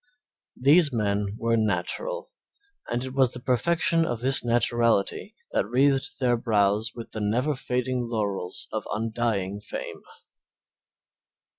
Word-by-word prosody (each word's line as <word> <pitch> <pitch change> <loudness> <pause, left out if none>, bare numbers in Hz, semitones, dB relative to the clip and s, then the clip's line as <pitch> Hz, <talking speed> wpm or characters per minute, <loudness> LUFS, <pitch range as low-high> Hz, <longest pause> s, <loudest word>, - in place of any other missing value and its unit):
These 145 +4 +5
men 105 -3 -1
were 115 0 +1
natural, 460 - -2 0.6
and 120 +1 -1
it 130 0 -6
was 130 -2 +2
the 125 - -7
perfection 165 +7 +2
of 120 -8 -2
this 130 +3 +3
naturality 120 -3 +1 0.2
that - - 0
wreathed 135 +4 +1
their 125 -2 +2
brows 110 -1 +1
with 115 - -8
the 110 - -5
never 120 +8 +1
fading 125 -2 -2
laurels 100 -5 -3
of 110 -1 -4
undying 110 -3 -1
fame. - - -7
120 Hz, 125 wpm, -26 LUFS, 105-130 Hz, 0.6 s, These